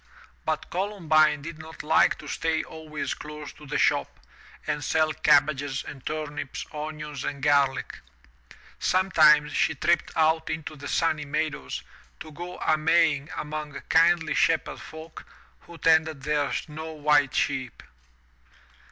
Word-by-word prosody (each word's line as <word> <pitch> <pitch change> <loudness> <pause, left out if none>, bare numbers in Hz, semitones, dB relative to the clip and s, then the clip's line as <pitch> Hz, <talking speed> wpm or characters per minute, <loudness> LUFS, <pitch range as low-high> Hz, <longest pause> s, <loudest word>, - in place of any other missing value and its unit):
But 155 -1 -2
Columbine 160 -6 +2
did 165 0 -7
not 160 +1 -9
like 160 +1 +4
to - - -11
stay 160 -1 -1
always 155 -2 -5
close 150 0 -9
to 150 - -14
the 150 +2 -1
shop - - +1 0.5
and 150 -1 -2
sell 155 +3 +1
cabbages 140 -2 +2
and 135 -3 -10
turnips, 150 -3 -5
onions 150 -2 -6
and 140 -1 -4
garlic. 140 -2 +2 0.8
Sometimes 155 -5 +4
she - - +1
tripped 170 +5 +1
out 160 0 +2
into 155 -1 -4
the 140 -1 -8
sunny 160 -3 0
meadows 150 - -3 0.4
to 155 - -9
go 175 +4 -8
a 155 -1 +1
maying 155 -2 +2
among 150 -1 -5
kindly 165 -1 +4
shepherd 165 -1 +1
folk 160 +1 -10 0.4
who 170 - -11
tended 160 -3 +2
their 145 -2 0
snow 160 +1 -5
white 145 -3 +2
sheep. 130 -5 -1
155 Hz, 135 wpm, -26 LUFS, 145-160 Hz, 0.8 s, like